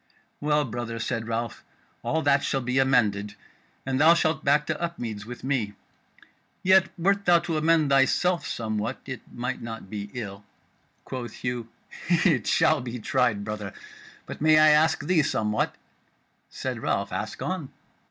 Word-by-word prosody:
"Well, 150 0 +1
brother," 115 -1 -5
said 115 0 -3
Ralph, 115 0 -3 0.4
"all 160 0 -1
that 140 -1 +3
shall 135 - 0
be 125 +1 0
amended, 105 -6 +2 0.5
and 130 +1 0
thou 165 +2 +7
shalt 160 -2 0
back 150 +1 +3
to - - -3
Upmeads 115 -12 -4
with 125 -1 -8
me. 125 -7 -1 0.9
Yet 190 0 +5
wert 200 +3 +1
thou 175 -1 +6
to 170 -1 -3
amend 155 -1 +3
thyself 140 +4 +3
somewhat, 110 -1 -3
it 130 -3 -6
might 125 +2 -4
not 115 -4 -7
be 105 -1 -5
ill." 100 -4 -6 0.6
Quoth 125 -2 -6
Hugh: 120 -2 -3 0.4
"It 165 - +3
shall 155 -3 +3
be 125 0 -5
tried, 120 -3 +1
brother. 105 -2 -5 0.5
But - - -8
may 155 0 +6
I 155 0 +7
ask 155 0 +3
thee 170 -1 +3
somewhat?" 110 -6 0 0.7
Said - - -4
Ralph: - - -1
"Ask - - -4
on." 180 -7 -3
130 Hz, 150 wpm, -26 LUFS, 115-155 Hz, 0.9 s, thou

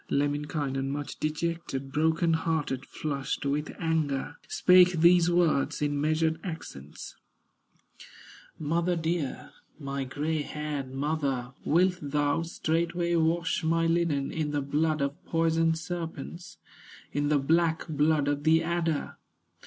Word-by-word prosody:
Lemminkainen, 145 -1 -1
much 145 +1 -5
dejected, 155 -3 -3
Broken 160 +3 +2
hearted, 155 -5 -1
flushed 140 -2 -3
with 145 +2 -1
anger, 155 -3 -1
Spake 180 0 +5
these 170 +1 +5
words 170 -5 +2
in 145 -1 0
measured 160 +1 +1
accents: 75 - -8 1.4
"Mother 170 +4 0
dear, 165 -4 -2 0.3
my 140 -2 -4
gray 150 +4 -2
haired 145 -3 -4
mother, 135 -3 -2
Wilt 180 +2 +2
thou 145 +2 0
straightway 170 +1 -1
wash 165 +1 +1
my 165 +1 +2
linen 165 -4 +1
In 155 -2 -2
the 145 -1 -1
blood 150 +1 0
of 145 +6 -4
poison 165 0 +2
serpents, 165 0 -6 0.6
In 145 0 0
the 150 - +4
black 160 +3 +1
blood 150 -1 +2
of 145 0 0
the 160 +1 +4
adder? 165 -2 -1
155 Hz, 120 wpm, -28 LUFS, 145-165 Hz, 1.4 s, Spake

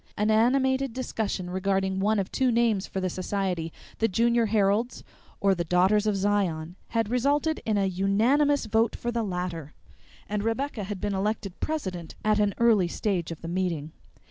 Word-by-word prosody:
An 210 +1 +2
animated 260 +3 +2
discussion 215 -7 -3
regarding 190 0 0
one 215 +3 +2
of 195 -1 -2
two 260 -2 +2
names 230 -4 +2
for 190 - -4
the 185 - -1
society, 185 -2 -2 0.3
The 225 - +3
Junior 235 +2 +2
Heralds 210 +3 +1 0.4
or 195 -1 +3
The 175 -2 -1
Daughters 190 +5 +3
of 210 - +2
Zion, 190 -5 0
had 225 -1 -1
resulted 290 +5 +1
in 215 -2 +2
a 200 - +2
unanimous 225 +10 +2
vote 225 +1 +1
for 240 - -3
the 235 -1 -1
latter, 180 -6 -4 0.5
and 210 0 -2
Rebecca 225 -1 -2
had 200 -1 -5
been 205 -1 -1
elected 195 -1 -2
president 185 - -4
at 215 0 +3
an 205 -1 +1
early 225 -6 +4
stage 180 -2 -2
of 165 - -7
the - - -5
meeting. 170 -4 -2
205 Hz, 170 wpm, -27 LUFS, 185-230 Hz, 0.5 s, early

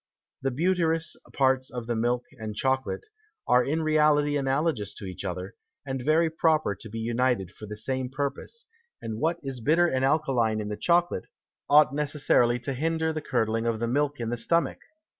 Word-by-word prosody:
The 135 - 0
butirous 165 +3 0 0.2
Parts 130 -1 +2
of 125 -2 -6
the 120 0 -1
Milk 120 +2 0
and 110 -1 -5
Chocolate, 130 +3 -1 0.4
are 125 0 +5
in 155 +5 -1
reality 150 -1 +3
analogous 135 -5 0
to 100 - -8
each 90 0 -7
other, 90 0 -4 0.3
and 135 -2 -3
very 160 +4 +3
proper 160 -6 +2
to 110 +4 -10
be 115 - -6
united 115 -4 0
for 105 - -11
the 105 0 -7
same 130 +3 -2
Purpose; 145 - -4 0.3
and 110 -1 -5
what 165 +3 +1
is 135 -2 -4
bitter 160 +9 +3
and 130 -6 0
alkaline 135 -7 +2
in 105 -1 -4
the 105 - -3
Chocolate, 175 - +1 0.4
ought 145 -2 +6
necessarily 140 -5 +2
to 135 +3 -3
hinder 160 +3 0
the 155 - -3
curdling 115 -4 0
of 115 -1 0
the 115 - -1
Milk 145 +3 0
in 115 -1 -2
the 120 - -1
Stomach. 170 +9 +1
130 Hz, 180 wpm, -27 LUFS, 115-155 Hz, 0.4 s, ought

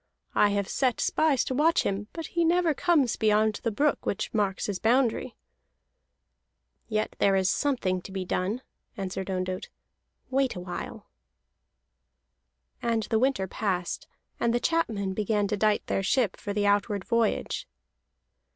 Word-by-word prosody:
I 210 - +4
have 200 -1 0
set 255 +1 0
spies 305 -5 +2
to - - -3
watch 310 +5 +3
him, 200 +1 -2
but 330 -1 -6
he 340 -1 +2
never 340 -1 +3
comes 290 -6 +2
beyond 215 -1 +2
the 230 - 0
brook 285 +7 +1
which 200 - -2
marks 200 -3 0
his 200 -3 -3
boundary." 240 +1 +1 1.5
"Yet 215 -1 -1
there 195 -1 +4
is 190 0 +3
something 200 -11 0
to 190 - -10
be 190 -1 -3
done," 195 +8 -1 0.3
answered 190 -1 -4
Ondott. 185 0 -3 0.6
"Wait 270 0 +1
awhile." 180 0 -6 1.8
And 230 -2 0
the 220 - +3
winter 260 -6 +1
passed, 185 -3 -2 0.3
and 235 0 +2
the - - +2
chapmen 220 - 0
began 210 0 0
to 210 - +1
dight 210 0 +1
their - - 0
ship 210 +1 +1
for 205 - -6
the 205 0 0
outward 205 0 +1
voyage. 230 -2 0
215 Hz, 145 wpm, -27 LUFS, 195-255 Hz, 1.8 s, I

